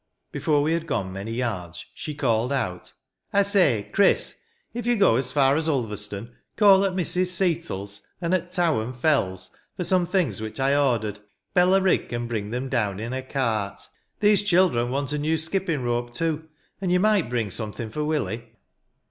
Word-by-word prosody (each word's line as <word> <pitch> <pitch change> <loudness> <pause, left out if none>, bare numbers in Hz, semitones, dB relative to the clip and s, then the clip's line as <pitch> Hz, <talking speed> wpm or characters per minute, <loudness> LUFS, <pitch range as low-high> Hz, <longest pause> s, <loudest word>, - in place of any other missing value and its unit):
Before 145 -2 +1
we 155 +2 +1
had 165 0 -2
gone 100 -11 -2
many 100 +4 -5
yards, 90 -8 -4
she 150 - -6
called 120 -3 +1
out, 95 -10 -3
— - - -59
*' - - -42
I 200 - +5
say, 165 - +2
Chris, 200 - +3 0.4
if 240 0 -4
you 240 -1 +3
go 195 - +5
as 130 +1 -1
far 135 -1 +4
as 160 +1 0
Ulverstone, 105 -4 -3 0.2
call 200 -2 +6
at 190 - 0
Mrs. 180 0 +1
Seatle's, 170 - -2 0.2
and 170 +1 -1
at 180 -1 -1
Tow 175 - +2
and 125 +4 -6
Fell's, 95 - 0 0.3
for 180 - -1
some 180 -1 +2
things 170 - 0
which 110 +4 -5
I 135 +1 +3
ordered. 115 -7 +1 0.3
Bella 185 +1 +5
Rigg 190 -1 +1
can 120 0 -3
bring 110 -3 -3
them 125 +4 -3
down 105 -6 -1
in 115 +2 -4
her 130 - -2
cart. 115 -7 -2 0.4
These 210 -1 +5
children 175 -11 +3
want 140 +2 -2
a 150 - -1
new 155 +2 +1
skipping 160 -3 -1
rope, 120 0 -2
too; 160 0 -2 0.3
and 185 -2 0
you 180 - +4
might 205 - +2
bring 115 -5 -1
something 110 +1 -5
for 150 +5 -2
Willie.' 120 -7 -2
140 Hz, 190 wpm, -25 LUFS, 115-175 Hz, 0.4 s, call